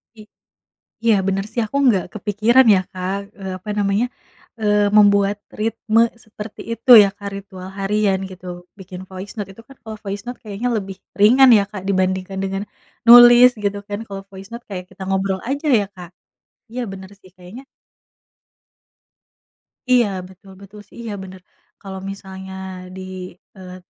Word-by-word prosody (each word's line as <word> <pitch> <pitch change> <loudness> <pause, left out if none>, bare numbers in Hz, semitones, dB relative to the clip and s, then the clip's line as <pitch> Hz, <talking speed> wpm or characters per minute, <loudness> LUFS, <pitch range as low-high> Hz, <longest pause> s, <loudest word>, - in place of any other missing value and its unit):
I 220 - -13 0.8
iya 225 - +5
bener 195 0 0
sih. 235 +1 -2
Aku 275 - -5
nggak 200 -7 +3
kepikiran 220 +5 +3
ya 185 - +3
Kak, 185 +1 -3 0.2
eee, 190 -1 -5
apa 200 +3 -8
namanya, 200 +4 +1 0.5
eee, 210 -1 +2
membuat 200 -1 +4 0.2
ritme 225 0 +1 0.2
seperti 215 0 -10
itu 255 +3 -3
ya 200 - +3
Kak, 200 -1 -7
ritual 190 -2 -9
harian 195 -1 +1
gitu. 185 0 -12 0.3
Bikin 185 -1 -9
voice 190 +1 -8
note 205 -2 -5
itu 225 +4 -15
kan 270 - -15
kalau 220 -1 -8
voice 205 0 -5
note 245 - -6
kayaknya 215 +3 -3
lebih 195 -2 -5 0.2
ringan 250 +5 +7
ya 200 - +1
Kak 205 -3 -7
dibandingkan 190 0 -1
dengan 195 +1 -3 0.5
nulis 240 +1 +10 0.2
gitu 200 0 -1
kan. 205 0 -4
Kalau 195 -1 -7
voice 195 +1 -11
note 235 +1 -8
kayak 185 -2 -6
kita 185 +1 -12
ngobrol 190 0 -1
aja 285 +3 -3
ya 200 - -3
Kak. 180 -2 -11 0.6
Iya 250 +1 -4
bener 190 -1 -9
sih 185 - -19
kayaknya 185 +8 -12 2.3
Iya 245 -3 +5 0.2
betul, 190 +1 -17
betul 200 +1 -13
sih. - - -19
Iya 220 - -5
bener. 185 -1 -11 0.4
Kalau 190 -1 -7
misalnya 190 -1 -10 0.4
di, 190 - -8 0.6
eee, 185 -1 -10
200 Hz, 160 wpm, -20 LUFS, 190-220 Hz, 2.3 s, nulis